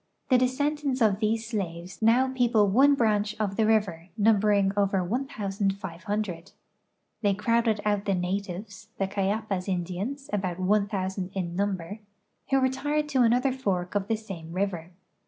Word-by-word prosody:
The 255 Hz, -, +6 dB
descendants 280 Hz, +1 st, 0 dB
of 210 Hz, -4 st, +3 dB
these 220 Hz, +1 st, 0 dB
.slaves 185 Hz, -5 st, -5 dB
now 235 Hz, +4 st, +4 dB
peoi)le 240 Hz, -5 st, +2 dB
one 270 Hz, +8 st, +5 dB
branch 215 Hz, -3 st, +1 dB
of 200 Hz, -2 st, -1 dB
the 220 Hz, 0 st, +2 dB
river, 190 Hz, -6 st, +1 dB
numbering 205 Hz, -2 st, +3 dB
over 195 Hz, -2 st, +2 dB
1 245 Hz, +10 st, -2 dB
,500. 195 Hz, -, -3 dB, 0.7 s
The\^ 200 Hz, -3 st, +2 dB
crowded 225 Hz, 0 st, +1 dB
out 205 Hz, -1 st, +1 dB
the 195 Hz, -, +1 dB
natives 190 Hz, +2 st, -4 dB
(the 195 Hz, -, +1 dB
Cayapas 200 Hz, 0 st, -1 dB
Indians, 190 Hz, +10 st, -3 dB
about 185 Hz, -4 st, -1 dB
1,000 190 Hz, -1 st, 0 dB
in 175 Hz, -3 st, -3 dB
number), 195 Hz, 0 st, -2 dB, 0.5 s
who 270 Hz, -, +4 dB
retired 290 Hz, +3 st, 0 dB
to 265 Hz, -3 st, +2 dB
another 245 Hz, +3 st, +3 dB
fork 185 Hz, -9 st, -2 dB
of 200 Hz, -1 st, -1 dB
the 225 Hz, 0 st, 0 dB
same 175 Hz, -7 st, -8 dB
river. 180 Hz, -3 st, -2 dB
205 Hz, 145 wpm, -27 LUFS, 190-230 Hz, 0.7 s, The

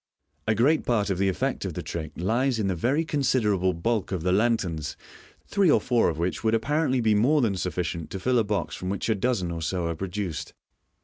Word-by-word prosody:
A 110 Hz, -, +3 dB
great 140 Hz, +9 st, +3 dB
part 105 Hz, -4 st, +1 dB
of 95 Hz, -, -1 dB
the 100 Hz, 0 st, +3 dB
effect 95 Hz, -, -1 dB
of -, -, -4 dB
the -, -, -4 dB
trick 80 Hz, -3 st, -5 dB
lies 120 Hz, +8 st, +1 dB
in 110 Hz, -, 0 dB
the 95 Hz, -, +1 dB
very 135 Hz, -, +1 dB
consider 130 Hz, -8 st, +1 dB
able 95 Hz, -1 st, +1 dB
bulk 100 Hz, +4 st, -1 dB
of 90 Hz, -4 st, -2 dB
the 90 Hz, -, +1 dB
lanterns, 95 Hz, -7 st, 0 dB, 0.5 s
three 200 Hz, -3 st, +2 dB
or -, -, +5 dB
four 120 Hz, -2 st, +2 dB
of 80 Hz, -, -4 dB
which 85 Hz, +5 st, -2 dB
would 110 Hz, 0 st, +3 dB
appa 115 Hz, +6 st, -1 dB
rently 135 Hz, -6 st, +2 dB
be 110 Hz, -1 st, +4 dB
more 125 Hz, +9 st, +3 dB
than 110 Hz, -7 st, +1 dB
sufficient 85 Hz, -2 st, -3 dB
to 95 Hz, -, -5 dB
fill 125 Hz, +6 st, +2 dB
a -, -, +3 dB
box 105 Hz, -1 st, -2 dB
from 90 Hz, -, -5 dB
which 100 Hz, +3 st, -2 dB
a -, -, +4 dB
dozen 105 Hz, -4 st, 0 dB
01 85 Hz, -1 st, -4 dB
so 85 Hz, +2 st, -1 dB
are 85 Hz, 0 st, -2 dB
produced. 90 Hz, -4 st, -4 dB
105 Hz, 235 wpm, -26 LUFS, 90-120 Hz, 0.5 s, or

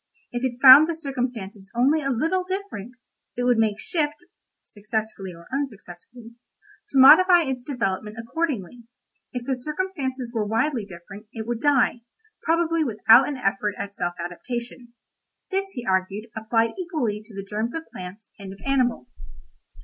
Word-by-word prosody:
If 245 Hz, +1 st, -4 dB
it 245 Hz, -2 st, -2 dB
found 275 Hz, +4 st, +10 dB
the 335 Hz, -, -1 dB
circumstances 245 Hz, -9 st, -5 dB
only 275 Hz, +6 st, +3 dB
a 275 Hz, -, -2 dB
little 325 Hz, +9 st, 0 dB
different, 365 Hz, -, -6 dB, 0.4 s
it 245 Hz, -, -1 dB
would 245 Hz, -2 st, +3 dB
make 215 Hz, -2 st, +1 dB
shift 300 Hz, +1 st, -1 dB, 0.5 s
(successfully 215 Hz, -2 st, -5 dB
or 170 Hz, -1 st, -14 dB
unsuccessfully) 230 Hz, -3 st, -6 dB, 0.6 s
to 275 Hz, -, -2 dB
modify 345 Hz, +6 st, +8 dB
its 265 Hz, -4 st, -3 dB
development 215 Hz, -5 st, -3 dB
accordingly; 240 Hz, -, -3 dB, 0.5 s
if 250 Hz, -1 st, -5 dB
the 265 Hz, -, 0 dB
circumstances 265 Hz, -4 st, -4 dB
were 225 Hz, -3 st, 0 dB
widely 225 Hz, +2 st, 0 dB
different, 195 Hz, +3 st, -12 dB
it 220 Hz, -2 st, -5 dB
would 235 Hz, 0 st, -3 dB
die, 275 Hz, -4 st, +2 dB, 0.4 s
probably 330 Hz, 0 st, +1 dB
without 225 Hz, 0 st, +5 dB
an 285 Hz, -, -4 dB
effort 205 Hz, -2 st, -1 dB
at 200 Hz, 0 st, -6 dB
self 175 Hz, 0 st, -3 dB
adaptation. 235 Hz, +7 st, -6 dB, 0.6 s
This, 390 Hz, +1 st, 0 dB
he 245 Hz, -, -5 dB
argued, 190 Hz, +4 st, -1 dB
applied 225 Hz, +1 st, +1 dB
equally 295 Hz, -, -2 dB
to 210 Hz, -1 st, -16 dB
the 195 Hz, 0 st, -6 dB
germs 220 Hz, +5 st, -3 dB
of 325 Hz, -, -4 dB
plants 185 Hz, +4 st, -10 dB
and 195 Hz, -1 st, -8 dB
of 195 Hz, -, -15 dB
animals. 245 Hz, -, -1 dB
240 Hz, 150 wpm, -24 LUFS, 210-275 Hz, 0.6 s, found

